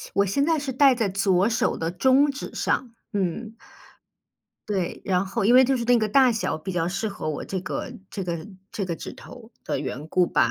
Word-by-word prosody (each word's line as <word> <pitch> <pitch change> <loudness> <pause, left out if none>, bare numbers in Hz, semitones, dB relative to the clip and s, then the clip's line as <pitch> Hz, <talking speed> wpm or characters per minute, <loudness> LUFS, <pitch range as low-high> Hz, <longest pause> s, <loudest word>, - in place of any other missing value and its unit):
我 200 0 +3
现 240 +9 +1
在 325 +1 +2
是 280 -2 -3
戴 270 +1 +5
在 230 -4 0
左 195 0 +2
手 230 - 0
的 165 +1 -2
中 265 +10 +4
指 275 - -7
上， 245 -3 -1 0.2
嗯。 205 +3 -2 1.1
对， 190 -4 -2
然 185 0 +1
后 200 +2 -2
因 235 +4 +5
为 260 +1 +8
就 265 +1 +2
是 235 - -3
那 245 0 +4
个 215 -1 0
大 260 +3 +5
小 220 -7 -1
比 170 +5 -6
较 175 -2 0
适 190 +5 -2
合 200 -5 -5
我 150 - -3
这 190 - -3
个， 185 - -5 0.2
这 195 - -5
个， 170 0 -4 0.2
这 210 -4 -3
个 175 - -3
指 - - -8
头 240 -3 -13
的 - - -2
缘 140 +2 -5
故 180 +1 +3
吧， 120 - +2
200 Hz, 235 characters per minute, -25 LUFS, 180-245 Hz, 1.1 s, 为